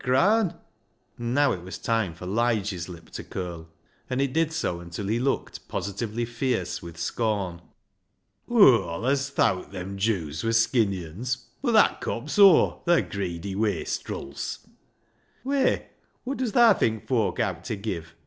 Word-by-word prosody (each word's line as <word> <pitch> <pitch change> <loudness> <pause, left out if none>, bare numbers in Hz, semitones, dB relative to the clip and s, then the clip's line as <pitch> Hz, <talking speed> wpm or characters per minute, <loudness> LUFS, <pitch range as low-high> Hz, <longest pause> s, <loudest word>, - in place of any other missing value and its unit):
And 185 - +3 0.6
now 130 +4 +2
it 90 - -3
was 95 +2 -7
time 110 -7 -1
for 90 - -9
Lige's 105 -4 0
lip 85 -2 -11
to - - -6
curl, 85 -3 -6 0.4
and 130 0 -1
it 135 -2 0
did 160 0 +2
so 155 - -2
until 85 +3 -6
he 110 +4 0
looked 135 +2 -2
positively 110 +3 -3
fierce 120 -5 -2
with 85 -1 -10
scorn. 95 -1 -2 0.3
' - - -49
" - - -35
Aw 125 - +6
allis 135 +6 0
thowt 95 -10 +1
them 95 +1 -6
Jews 85 -8 -1
wur 115 - +1
skinny 110 -5 +2
uns 115 +11 -3
■ - - -20
— - - -39
but 245 -4 +1
that 220 - +4
cops 145 - -3
aw 195 -5 +7
— - - -34
the 170 0 +4
greedy 95 -1 -4
wastrils." 95 -8 -3 0.4
" - - -39
Whey, 275 +1 +1 0.4
wot 270 +2 -3
does 250 -5 -2
thaa 235 -3 +7
think 110 - -1
foak 120 -2 +1
owt 95 -7 -1
ta 110 - -3
give? 95 -6 -5
110 Hz, 165 wpm, -26 LUFS, 90-135 Hz, 0.6 s, aw